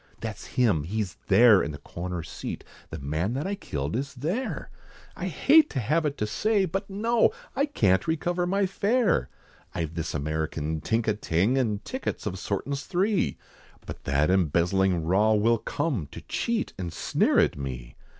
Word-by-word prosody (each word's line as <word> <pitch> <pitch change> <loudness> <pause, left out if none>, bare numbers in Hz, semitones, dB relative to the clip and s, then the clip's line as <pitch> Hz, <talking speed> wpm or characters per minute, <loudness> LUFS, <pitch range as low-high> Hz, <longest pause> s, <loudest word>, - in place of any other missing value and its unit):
That's 110 -1 -6
him! 110 -11 +3
he's 100 0 -3
there 115 -5 +7
in - - -2
the - - -6
corner 85 +3 -5
seat, - - -6 0.3
The 80 - -6
man 80 - -2
that 135 +4 -2
I 195 - -1
killed 75 - -4
is 140 +3 -3
there, 170 - -3 0.4
I - - -4
hate 310 +3 +5
to 135 - -2
have 150 +7 +1
it 140 - -4
to 105 - 0
say, 205 - +1
But 195 +3 -3
no, 225 +4 +3 0.3
I 280 - +2
can't 95 - +2
recover 175 +2 0
my 195 +2 +2
fare! 200 - +1 0.5
I've 80 -2 -2
this 80 -1 -3
American 80 +1 -2
tink 115 0 0
a 110 - +3
ting, 100 +3 +1
And 110 -6 0
tickets 260 - -4
of 95 -3 -3
sortin's 135 +10 -3
three, 195 +3 +1 0.5
But - - -9
that 70 +5 +2
embezzling 90 0 +2
raw 100 +6 +3
will 115 +2 +3
come 115 - -2
To - - -8
cheat, 230 -1 -2
and 90 -2 -3
sneer - - +1
at - - +4
me. 65 -3 -6
110 Hz, 170 wpm, -27 LUFS, -, 0.5 s, there